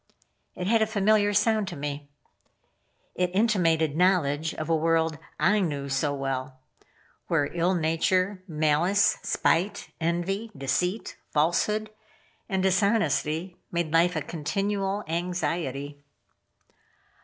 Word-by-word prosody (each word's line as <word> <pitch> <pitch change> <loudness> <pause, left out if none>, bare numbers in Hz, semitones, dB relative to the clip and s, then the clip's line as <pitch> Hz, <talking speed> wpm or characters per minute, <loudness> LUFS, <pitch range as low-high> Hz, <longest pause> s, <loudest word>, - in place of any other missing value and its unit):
It 180 - -4
had 225 +3 +3
a 220 - +3
familiar 205 0 +3
sound 210 0 +2
to 180 - -5
me. 145 0 -5 1.0
It 180 0 0
intimated 165 -8 +2
knowledge 160 -4 +2
of 155 - -4
a 165 - +2
world 160 0 +1 0.2
I 190 +7 +3
knew 145 -7 -2
so 135 +2 0
well; 135 -1 -3 0.7
where 145 -4 +1
ill 175 +2 +1
nature, 185 +4 +1
malice, 160 +5 +2
spite, 185 +5 0
envy, 175 +6 -1
deceit, 180 - -1
falsehood 210 +8 +1 0.6
and 190 -2 0
dishonesty, 190 -4 +1
made 170 -2 -2
life 170 +2 +4
a 155 - -1
continual 195 +6 -2
anxiety. 155 -4 -3
170 Hz, 110 wpm, -26 LUFS, 155-195 Hz, 1.0 s, life